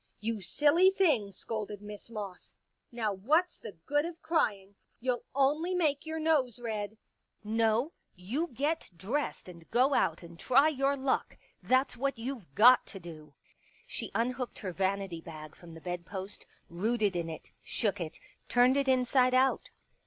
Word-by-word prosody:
" -, -, -43 dB
You 220 Hz, 0 st, -3 dB
silly 295 Hz, -, +4 dB
thing," 305 Hz, -, +2 dB
scolded 210 Hz, +1 st, -5 dB
Miss 210 Hz, +1 st, -10 dB
Moss. 205 Hz, -5 st, -7 dB, 0.2 s
" -, -, -49 dB
Now 225 Hz, -4 st, -1 dB
what's 310 Hz, -, +1 dB
the 215 Hz, -, -8 dB
good 290 Hz, +1 st, +2 dB
of 335 Hz, 0 st, -6 dB
crying: 205 Hz, -, 0 dB, 0.3 s
you'll 250 Hz, 0 st, -1 dB
only 300 Hz, +6 st, +2 dB
make 310 Hz, -4 st, +1 dB
your 320 Hz, 0 st, -3 dB
i6o -, -, -3 dB
Pictures -, -, -4 dB
nose 265 Hz, -8 st, +2 dB
red. 215 Hz, -2 st, -4 dB, 0.5 s
No, 225 Hz, +6 st, +1 dB, 0.2 s
you 230 Hz, -, -2 dB
get 295 Hz, +4 st, -2 dB
dressed 240 Hz, -, -3 dB
and 170 Hz, -2 st, -13 dB
go 260 Hz, +4 st, +3 dB
out -, -, +1 dB
and 170 Hz, 0 st, -12 dB
try 275 Hz, +4 st, +5 dB
your 280 Hz, -1 st, +1 dB
luck 265 Hz, 0 st, -1 dB
— -, -, -39 dB
that's 260 Hz, 0 st, +2 dB
what 275 Hz, +1 st, -1 dB
youVe 235 Hz, -5 st, -5 dB
got 245 Hz, +4 st, +7 dB
to 195 Hz, -, -8 dB
do." 155 Hz, -4 st, -11 dB, 0.5 s
She -, -, -5 dB
unhooked 245 Hz, +3 st, -1 dB
her 185 Hz, -, -2 dB
vanity 190 Hz, -2 st, -1 dB
bag 155 Hz, -2 st, -10 dB
from 170 Hz, -2 st, -13 dB
the -, -, -9 dB
bedpost, 185 Hz, +3 st, -6 dB, 0.2 s
rooted 205 Hz, +2 st, 0 dB
in 170 Hz, -1 st, -2 dB
it, 160 Hz, -, -9 dB
shook 205 Hz, -4 st, -1 dB
it, 160 Hz, -2 st, -5 dB, 0.3 s
turned 250 Hz, +2 st, +5 dB
it 280 Hz, -1 st, +1 dB
inside 255 Hz, 0 st, +3 dB
out. 265 Hz, +1 st, +2 dB
235 Hz, 170 wpm, -31 LUFS, 195-275 Hz, 0.5 s, got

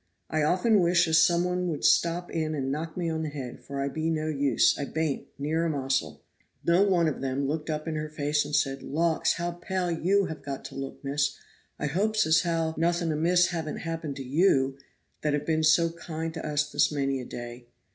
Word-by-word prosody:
I 155 Hz, -, +1 dB
often 195 Hz, +8 st, +3 dB
wish 175 Hz, -1 st, +3 dB
as 160 Hz, 0 st, +5 dB
some 170 Hz, +1 st, +4 dB
one 180 Hz, 0 st, -1 dB
would 155 Hz, -4 st, -2 dB
step 170 Hz, +1 st, +2 dB
in 155 Hz, -1 st, -1 dB
and 135 Hz, -2 st, -2 dB
knock 160 Hz, +3 st, -4 dB
me 175 Hz, -2 st, -1 dB
on 160 Hz, -1 st, -1 dB
the 155 Hz, -, -2 dB
head, 135 Hz, -4 st, -7 dB
for 140 Hz, -1 st, -6 dB
I 140 Hz, -, 0 dB
be 160 Hz, +3 st, -2 dB
no 155 Hz, -1 st, -1 dB
use, 140 Hz, -2 st, +3 dB
I 140 Hz, -, -3 dB
baint, 155 Hz, -1 st, -2 dB
neer 155 Hz, +4 st, 0 dB
a 170 Hz, -, +1 dB
mossel." 135 Hz, -3 st, -2 dB, 0.4 s
No 170 Hz, +2 st, +4 dB
one 185 Hz, -5 st, +3 dB
of 150 Hz, -, -2 dB
them 135 Hz, +1 st, -1 dB
looked 150 Hz, +3 st, -3 dB
up 155 Hz, +1 st, -3 dB
in 160 Hz, -, -1 dB
her 155 Hz, 0 st, -3 dB
face 150 Hz, 0 st, 0 dB
and 145 Hz, 0 st, -3 dB
said, 135 Hz, -2 st, +1 dB
"Lauks, 160 Hz, +2 st, +1 dB
how 175 Hz, +1 st, -2 dB
pale 180 Hz, +1 st, -2 dB
you 190 Hz, +4 st, +2 dB
ha 160 Hz, -, -4 dB
got 140 Hz, -3 st, -7 dB
to -, -, -8 dB
look, 135 Hz, +1 st, -6 dB
miss; 140 Hz, +1 st, 0 dB, 0.4 s
I -, -, -3 dB
hopes 210 Hz, +8 st, +1 dB
as 160 Hz, -1 st, +4 dB
how 165 Hz, -1 st, 0 dB
nothing 170 Hz, 0 st, +1 dB
amiss 175 Hz, +3 st, +3 dB
haven't 160 Hz, -4 st, -3 dB
happened 165 Hz, -3 st, -4 dB
to 135 Hz, -, -6 dB
you, 135 Hz, -1 st, +2 dB, 0.5 s
that 150 Hz, -1 st, 0 dB
have 145 Hz, 0 st, -1 dB
been 160 Hz, 0 st, +1 dB
so 165 Hz, +2 st, +4 dB
kind 165 Hz, -1 st, -5 dB
to 160 Hz, -, -6 dB
us 150 Hz, 0 st, -1 dB
this -, -, +3 dB
many 135 Hz, -2 st, -1 dB
a -, -, -7 dB
day." 120 Hz, 0 st, -8 dB
155 Hz, 220 wpm, -27 LUFS, 145-170 Hz, 0.5 s, as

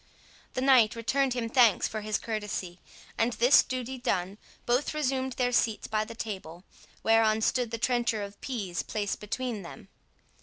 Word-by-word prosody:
The 255 Hz, -, -1 dB
knight 255 Hz, -5 st, +5 dB
returned 260 Hz, +3 st, 0 dB
him 235 Hz, -2 st, -2 dB
thanks 235 Hz, -3 st, +4 dB
for 215 Hz, -, -5 dB
his 215 Hz, 0 st, -1 dB
courtesy; 205 Hz, -5 st, -4 dB, 0.4 s
and, 235 Hz, +2 st, +2 dB
this 245 Hz, +5 st, +6 dB
duty 255 Hz, 0 st, -5 dB
done, 195 Hz, -5 st, -2 dB, 0.3 s
both 250 Hz, +5 st, 0 dB
resumed 265 Hz, -3 st, -1 dB
their 245 Hz, 0 st, 0 dB
seats 225 Hz, -3 st, +1 dB
by 215 Hz, 0 st, -1 dB
the 230 Hz, -, -9 dB
table, 190 Hz, -6 st, -6 dB, 0.4 s
whereon 220 Hz, -1 st, +3 dB
stood 245 Hz, +1 st, +1 dB
the 230 Hz, -, -3 dB
trencher 235 Hz, -3 st, 0 dB
of 200 Hz, 0 st, -10 dB
pease 200 Hz, -10 st, -3 dB
placed 205 Hz, -2 st, -3 dB
between 225 Hz, +1 st, -4 dB
them. 195 Hz, +3 st, -11 dB
225 Hz, 160 wpm, -28 LUFS, 210-250 Hz, 0.4 s, this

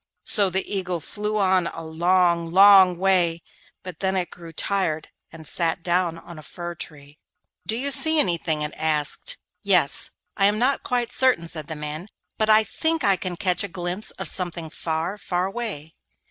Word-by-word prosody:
So 200 Hz, -3 st, +5 dB
the 190 Hz, +1 st, -2 dB
Eagle 185 Hz, -3 st, -3 dB
flew 210 Hz, +6 st, -4 dB
on 185 Hz, -3 st, +2 dB
a 165 Hz, -, -7 dB
long, 170 Hz, +1 st, +1 dB
long 190 Hz, -1 st, +7 dB
way, 175 Hz, -3 st, +1 dB, 0.4 s
but 180 Hz, -4 st, -9 dB
then 190 Hz, 0 st, -1 dB
it 180 Hz, -2 st, -2 dB
grew 170 Hz, -1 st, -11 dB
tired 165 Hz, -2 st, -1 dB, 0.2 s
and 160 Hz, -1 st, -12 dB
sat 165 Hz, +2 st, -1 dB
down 175 Hz, -1 st, 0 dB
on 170 Hz, -1 st, -12 dB
a -, -, -10 dB
fir 175 Hz, +3 st, -7 dB
tree. 150 Hz, -2 st, -11 dB, 0.5 s
'Do 220 Hz, -, 0 dB
you 280 Hz, +3 st, -1 dB
see 315 Hz, +3 st, +5 dB
anything?' 165 Hz, -, 0 dB
it 150 Hz, 0 st, -4 dB
asked. 150 Hz, -2 st, 0 dB, 0.2 s
'Yes; -, -, +2 dB, 0.3 s
I 195 Hz, -, +3 dB
am 210 Hz, +1 st, +1 dB
not 255 Hz, +5 st, +1 dB
quite 245 Hz, -1 st, -2 dB
certain,' 250 Hz, -12 st, +2 dB
said 155 Hz, -3 st, -5 dB
the 160 Hz, -, -5 dB
man, 150 Hz, +4 st, -6 dB, 0.3 s
'but 215 Hz, 0 st, +1 dB
I 215 Hz, 0 st, +6 dB
think 320 Hz, +8 st, -1 dB
I 200 Hz, -1 st, +4 dB
can 180 Hz, 0 st, -5 dB
catch 180 Hz, -1 st, +1 dB
a -, -, -3 dB
glimpse 180 Hz, +3 st, -4 dB
of 190 Hz, -, -5 dB
something 170 Hz, -2 st, -2 dB
far, 165 Hz, +6 st, -3 dB
far 180 Hz, -1 st, -2 dB
away. 195 Hz, -7 st, -5 dB
180 Hz, 180 wpm, -23 LUFS, 165-200 Hz, 0.5 s, long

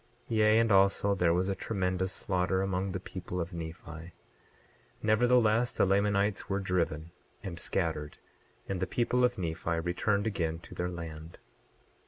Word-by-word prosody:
28:3 -, -, +1 dB
Yea, 110 Hz, 0 st, +5 dB
and 115 Hz, -1 st, +3 dB
also 100 Hz, +1 st, +4 dB
there 90 Hz, -4 st, +2 dB
was 90 Hz, +2 st, +1 dB
a 100 Hz, -, +1 dB
tremendous 95 Hz, -2 st, -1 dB
slaughter 95 Hz, 0 st, 0 dB
among 95 Hz, 0 st, -1 dB
the 95 Hz, -, -3 dB
people 90 Hz, -1 st, -6 dB
of 85 Hz, +2 st, -4 dB
Nephi; 85 Hz, 0 st, -8 dB, 0.9 s
nevertheless, 115 Hz, +1 st, +3 dB
the -, -, +3 dB
Lamanites 100 Hz, +1 st, +1 dB
were 100 Hz, 0 st, 0 dB
driven 85 Hz, -4 st, -1 dB, 0.3 s
and 90 Hz, -4 st, -6 dB
scattered, 80 Hz, -5 st, -2 dB, 0.5 s
and 95 Hz, -2 st, -2 dB
the -, -, -1 dB
people 125 Hz, +1 st, +1 dB
of 125 Hz, 0 st, +2 dB
Nephi 85 Hz, -2 st, -2 dB
returned 100 Hz, +4 st, 0 dB
again 85 Hz, -7 st, -1 dB
to 85 Hz, -, -12 dB
their 90 Hz, 0 st, -2 dB
land. 80 Hz, -2 st, -8 dB
95 Hz, 155 wpm, -30 LUFS, 85-100 Hz, 0.9 s, Yea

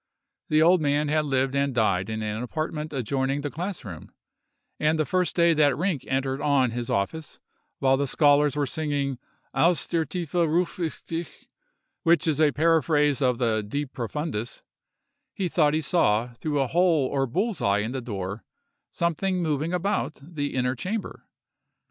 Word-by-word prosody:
The 155 Hz, 0 st, +4 dB
old 175 Hz, +1 st, +5 dB
man 145 Hz, 0 st, +1 dB
had 155 Hz, 0 st, +1 dB
lived 135 Hz, -1 st, +1 dB
and 140 Hz, -2 st, 0 dB
died 100 Hz, -4 st, +1 dB
in 110 Hz, 0 st, -3 dB
an 105 Hz, +1 st, -3 dB
apartment 155 Hz, +4 st, -4 dB
adjoining 135 Hz, +1 st, -1 dB
the 145 Hz, 0 st, -4 dB
class 180 Hz, -3 st, -5 dB
room; 85 Hz, -6 st, -9 dB, 0.7 s
and 155 Hz, +1 st, +2 dB
the 155 Hz, -, +1 dB
first 180 Hz, +5 st, 0 dB
day 170 Hz, -1 st, +4 dB
that 145 Hz, -4 st, +3 dB
Rinck 170 Hz, -5 st, -1 dB
entered 135 Hz, +1 st, -1 dB
on 135 Hz, -4 st, +2 dB
his 120 Hz, 0 st, -4 dB
office, 145 Hz, +11 st, -2 dB, 0.4 s
while 135 Hz, 0 st, +3 dB
the 140 Hz, +1 st, 0 dB
scholars 145 Hz, +1 st, +3 dB
were 145 Hz, -1 st, +1 dB
singing 140 Hz, -3 st, -2 dB, 0.3 s
Aus 170 Hz, -1 st, +2 dB
der 165 Hz, -1 st, 0 dB
tiefe 170 Hz, -4 st, -5 dB
ruf 175 Hz, +1 st, +1 dB
ich 165 Hz, -3 st, -3 dB
dich, 165 Hz, 0 st, -6 dB, 0.6 s
which 170 Hz, 0 st, +3 dB
is 155 Hz, -2 st, +1 dB
a 150 Hz, -2 st, +5 dB
paraphrase 150 Hz, -2 st, +2 dB
of 125 Hz, -2 st, +2 dB
the 115 Hz, -3 st, +1 dB
De 140 Hz, +8 st, -3 dB
profundis, 130 Hz, -2 st, -5 dB, 0.7 s
he 190 Hz, -, -1 dB
thought 155 Hz, -3 st, +2 dB
he 160 Hz, -, +1 dB
saw, 120 Hz, -7 st, +1 dB
through 145 Hz, +4 st, -2 dB
a 135 Hz, -, +2 dB
hole 165 Hz, -1 st, +2 dB
or 135 Hz, 0 st, 0 dB
bull's 200 Hz, -, -1 dB
eye 100 Hz, 0 st, +2 dB
in 110 Hz, +3 st, -3 dB
the 130 Hz, 0 st, -3 dB
door, 100 Hz, -3 st, -5 dB, 0.5 s
something 180 Hz, +2 st, -1 dB
moving 155 Hz, +1 st, -1 dB
about 180 Hz, -2 st, -1 dB
the 145 Hz, -3 st, -4 dB
inner 125 Hz, 0 st, +1 dB
chamber. 195 Hz, -, -5 dB
145 Hz, 170 wpm, -25 LUFS, 130-165 Hz, 0.7 s, old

